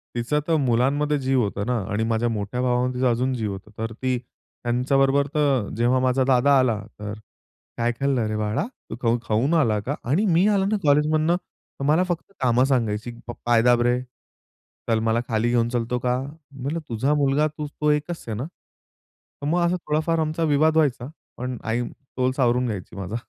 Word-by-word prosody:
तिचा 120 +5 0
तर 165 - +3
मुलांमध्ये 140 +5 +2
जीव 130 -1 +3
होता 100 -1 -2
ना 125 +1 0
आणि 105 +2 0
माझ्या 115 +1 +1
मोठ्या 110 +3 -3
भावामध्ये 125 0 0
तिचा 130 - +4
अजून 125 +3 0
जीव 110 -5 -2
होता. 100 +2 -9
तर 115 0 -4
ती 130 +2 -1
त्यांच्याबरोबर 135 +3 0
तर 140 -8 +2
जेव्हा 120 +2 +3
माझा 130 +1 +2
दादा 135 +2 +4
आला 120 -5 +2 0.2
तर 105 0 -5 0.6
काय 120 0 +1
खाल्लं 135 -4 +1
रे 110 - -2
बाळा? 105 - -1 0.2
तू - - -5
खाऊ 115 0 +2
खाऊन 115 +8 +1
आला 115 -10 +3
का? 130 +8 -3
आणि 155 - +1
मी 185 +1 +4
आला 200 -2 +2
ना 210 +2 +1
कॉलेजमधनं 155 +3 +3
तर 180 - -11
मला 155 +5 +4
फक्त 180 0 -4
कामं 125 -1 +3
सांगायची. 120 -4 0 0.2
प - - -3
पाय 120 -1 +4
दाब 120 0 +4
रे, 120 +1 +2 0.9
चल 115 -1 +3
मला 110 +1 +2
खाली 115 0 +1
घेऊन 120 -1 +2
चलतो 120 0 -1
का? 125 0 +2 0.3
म्हणलं 140 +4 -4
तुझा 120 +5 +1
मुलगा 145 +1 +2
तू 150 0 -6
तो 150 +1 -2
एकच 155 +3 -2
आहे 110 - -3
ना? 125 - -3
तर 155 -3 -17
मग 175 +3 +2
असा 175 +1 +1
थोडाफार 160 +2 +1
आमचा 155 +1 -1
विवाद 155 +2 +3
व्हायचा. 130 -5 +1 0.3
पण 125 0 -4
आई 115 +2 -1
तोल 130 -2 -3
सावरून 125 -1 +2
घ्यायची 100 -6 -5
माझा. 100 +2 -5
125 Hz, 190 wpm, -24 LUFS, 115-150 Hz, 0.9 s, तिचा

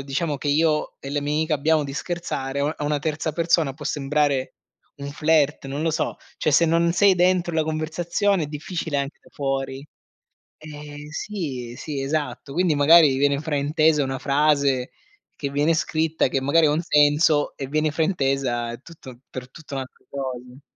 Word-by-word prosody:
diciamo 145 +2 -2
che 145 - -3
io 150 +1 +1
e 135 - -7
le 145 - -1
mia 150 +2 0
amica 160 -1 0
abbiamo 155 +1 +2
di 140 - -6
scherzare, 145 -5 -3
a 150 +2 0
a 150 - -3
una 145 0 0
terza 155 +1 -2
persona 165 -3 +2
può 150 - -10
sembrare 145 -2 0 0.4
un 140 0 -6
flirt, 150 -1 +1
non 140 +3 -4
lo 165 - +1
so, 155 - -2 0.2
cioè, 155 - +1
se 165 +4 +5
non 170 +1 +3
sei 195 +2 +5
dentro 180 -1 +2
la 160 - +2
conversazione, 165 +4 0
è - - -5
difficile 155 +1 -4
anche 140 +1 -4
da - - -19
fuori. 135 0 -3 0.7
Eh, 150 -1 -10
sì, 150 - -5
sì, 145 -3 -4
esatto, 140 -2 -3
quindi 175 -1 +2
magari 145 0 +6
viene 140 0 +2
fraintesa 150 0 +2
una 135 -1 -3
frase 140 -2 +2 0.5
che 140 - -3
viene 145 +4 +2
scritta, 160 0 0
che 135 +1 -1
magari 145 +4 +4
ha - - +2
un 155 +2 +1
senso, 150 -1 +3
e 135 - -4
viene 155 +2 0
fraintesa, 135 -7 0
è 120 - -9
tutto 130 -7 -13
per 125 0 -8
tutta 150 -2 -9
un'alt 130 -1 -4 0.2
cose. 130 -1 -6
150 Hz, 175 wpm, -23 LUFS, 140-160 Hz, 0.7 s, magari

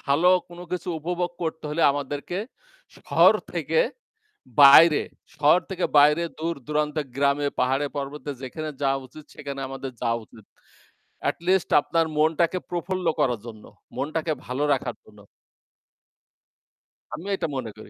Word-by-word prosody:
ভালো 160 +6 +3 0.2
কোন 175 0 -13
কিছু 180 +1 -3
উপভোগ 175 +2 -2
করতে 160 -1 -4
হইলে 155 +3 -1
আমাদেরকে 145 +5 -4 0.6
শহর - - +4 0.2
থেকে 480 - +1 0.8
বাইরে, 150 +3 +8 0.3
শহর 150 +4 +5
থেকে 185 -1 -2
বাইরে 150 +3 +5 0.2
দূর-দূরান্তের 150 -1 -2
গ্রামে, 140 +1 +2
পাহাড়ে, 135 +3 +1
পর্বতে 145 +1 -5
যেখানে 155 +4 -5
যাওয়া 135 0 +1
উচিত 150 +4 -14
সেখানে 140 -1 -7
আমাদের 135 0 -6
যাওয়া 115 -1 0
উচিত। 110 - -17 0.9
At - - -7
least 190 -1 +2
আপনার 160 +3 0
মনটাকে 165 +3 +2
প্রফুল্ল 180 +1 -3
করার 120 -5 +1
জন্য, 110 -2 -10 0.3
মনটাকে 155 +2 -2
ভালো 130 +4 -2
রাখার 125 -3 -2
জন্য। 105 -1 -19 2.0
আমিও 200 +4 -5
এটা 175 - -2
মনে 120 -4 -4
করি। 110 - -12
150 Hz, 130 wpm, -24 LUFS, 135-165 Hz, 2.0 s, বাইরে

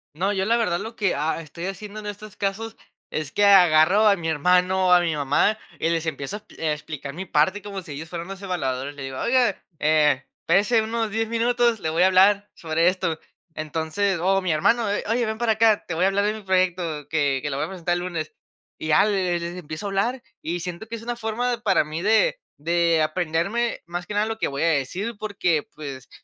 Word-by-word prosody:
No, 190 +6 0
yo 190 -1 0
la 230 +3 +3
verdad, 180 -7 0
lo 225 +4 -7
que, 200 -4 0
ah, 155 +3 -1
estoy 165 +2 -8
haciendo 200 +2 -6
en 210 - -10
estos 205 0 -8
casos, 220 +3 -3 0.4
es 155 -2 -3
que 205 - +2
agarro 185 +1 +6
a 205 - +6
mi 170 -3 -5
hermano 180 +4 +2
o - - +3
a 180 - +8
mi 165 -3 0
mamá 145 +9 +2 0.2
y 165 - +1
les 165 -1 0
empiezo 145 +3 -3
a - - -12
exp - - -19
eh, 160 - 0
a - - +2
explicar 150 -2 -7
mi 185 +5 -6
parte 190 +6 +1
como 200 -1 -6
si 165 - -10
ellos 160 +3 -7
fueran 170 0 -6
los 195 0 -8
evaluadores. 145 -7 -3
Le 145 - -8
digo: 135 -1 -6
"Oiga, 245 -5 +2 0.2
eh, 150 -3 +3 0.2
espérese 210 +7 +3
unos 225 0 -2
10 225 +1 -1
minutos, 235 0 +2
le 160 - -2
voy 165 +3 +2
a - - +6
hablar 200 +2 +4
sobre 165 +1 0
esto". 165 -3 -2 0.3
Entonces 160 +5 -1
o 195 +2 +2
mi 185 -2 -1
hermano: 215 +8 +2
"Eh, 205 - -1
oye, 235 +1 +1
ven 220 0 -3
para 230 -1 +2
acá. 220 -1 +3
Te 175 - -3
voy 165 +3 0
a - - +5
hablar 200 +1 +1
de 210 - +1
mi 220 - -8
proyecto 180 -6 0
que 145 -4 +1
que 145 - -3
lo 135 - -3
voy - - 0
a - - -8
presentar 175 -2 -2
el - - -1
lunes". 160 -4 -4 0.5
Y 155 - -5
ya 150 +5 +5
le 185 -4 0
les 170 +1 -5
empiezo 155 +1 -6
a - - -2
hablar 235 +6 -1 0.2
y 175 +2 -3
siento 175 +5 -6
que 230 - -5
es 225 - -8
una 240 +1 -3
forma 235 +2 -2
para - - +3
mí 155 +2 -5
de 225 - +3 0.2
de 170 +1 +2
aprenderme, 175 +8 -1
más 175 +1 -5
que - - -5
nada, 210 +1 +2
lo 225 0 -3
que - - 0
voy 140 +2 -3
a - - +3
decir 175 - -1
porque, 190 -7 0
pues, 140 -3 -8
180 Hz, 240 wpm, -24 LUFS, 160-210 Hz, 0.5 s, a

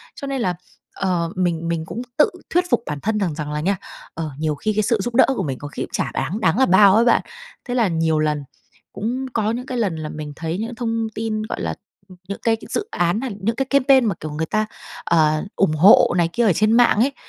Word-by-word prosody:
cho 280 - -7
nên 270 -3 -2
là, 180 -4 0 0.4
ờ, 175 -3 -1
mình 170 -2 -1
mình 165 -1 -2
cũng 235 - -6 0.2
tự 300 - +5 0.2
thuyết 355 +1 +2
phục 230 - +2
bản 145 -1 -4
thân 215 +1 0
rằng 170 -7 -1
rằng 150 -2 -5
là 150 - -2
nha, 195 +3 0 0.4
ờ, 160 -2 -4
nhiều 155 -1 0
khi 215 +7 -2
cái 215 0 +1
sự 230 0 +1
giúp 240 -1 -4
đỡ 260 - +7
của - - -1
mình 135 -4 -3
có 145 - -7
khi - - -5
cũng - - -9
chả - - -1
đáng 160 +11 -2
đáng 185 +7 +2
là 265 - +6
bao 190 +2 +6
ấy 230 +2 +4
bạn, 235 - +4 0.4
thế 245 -1 -3
là 230 -5 +3
nhiều 160 -2 +1
lần 150 -2 0 0.5
cũng 250 +5 -3
có 220 -1 0
những 250 +2 -4
cái 255 -1 -4
lần 195 -7 0
là 155 -1 -5
mình 150 -1 -7
thấy 165 +2 -3
những 225 - -2
cái - - -7
thông 230 -2 -1
tin, 220 -1 -2
gọi - - -5
là, - - -2 0.3
ừm, 185 - -14
những 200 - -5
cái 225 -1 +3
dự 420 - -2
án, 175 +5 +1
à, - - -2
hay 200 -4 -6
những 225 +3 0
cái 270 - -1
campaign 270 -2 +4
mà, 200 -5 0
kiểu, 155 0 -6
người 160 +2 -2
ta, 215 +5 0 0.4
ờ, 155 -2 +2
ủng 195 -5 +2
hộ 180 +3 +6
này 170 -1 +2
kia 235 -1 +2
ở 195 - +4
trên 215 +4 +2
mạng 235 -3 +4
ấy, 275 +4 +2
200 Hz, 265 wpm, -21 LUFS, 160-230 Hz, 0.5 s, đỡ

